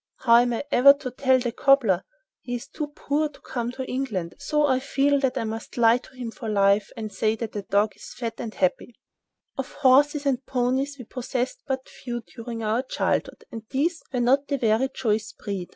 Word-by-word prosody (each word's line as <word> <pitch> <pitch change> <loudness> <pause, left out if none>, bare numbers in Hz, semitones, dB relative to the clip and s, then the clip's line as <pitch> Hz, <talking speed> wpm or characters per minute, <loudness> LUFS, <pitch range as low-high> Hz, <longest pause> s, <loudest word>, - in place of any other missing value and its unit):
How 235 -2 +6
am 245 0 +3
I 230 - -2
ever 280 +3 +8
to 280 -3 -7
tell 260 +1 +3
the 245 -2 -2
cobbler? 235 -8 +3 0.4
He 245 - -4
is 245 +3 -6
too 300 +1 -4
poor 295 +1 -1
to 290 - -18
come 240 -1 -4
to 260 0 -5
England, 225 -11 -3
so 300 -1 +1
I 260 -2 +2
feel 280 +1 +2
that 265 -2 0
I - - 0
must 225 +2 -6
lie 235 0 +5
to 260 - -18
him 245 -3 -5
for 225 -1 -6
life, 200 0 +3
and 215 -2 -5
say 215 +3 +1
that 225 -1 -5
the 205 - -4
dog 205 +2 +1
is - - -12
fat 230 -3 -3
and 225 - -4
happy." 195 +5 -1
[Picture: - - -48
Mrs. - - -56
Bouncer] 270 +1 -3
Of - - -16
horses 290 +2 +4
and 265 -2 0
ponies 265 +2 0
we 250 - -9
possessed 250 +1 -3
but 265 -1 -3
few 240 -1 -6
during 230 -1 -6
our 220 +3 +1
childhood, 260 - -2
and 225 - -6
these 320 +5 0
were 255 - -1
not 275 +4 +2
of 280 - +1
very 225 +3 +2
choice 220 -3 -1
breed. 195 -4 -5
245 Hz, 220 wpm, -25 LUFS, 225-270 Hz, 0.4 s, ever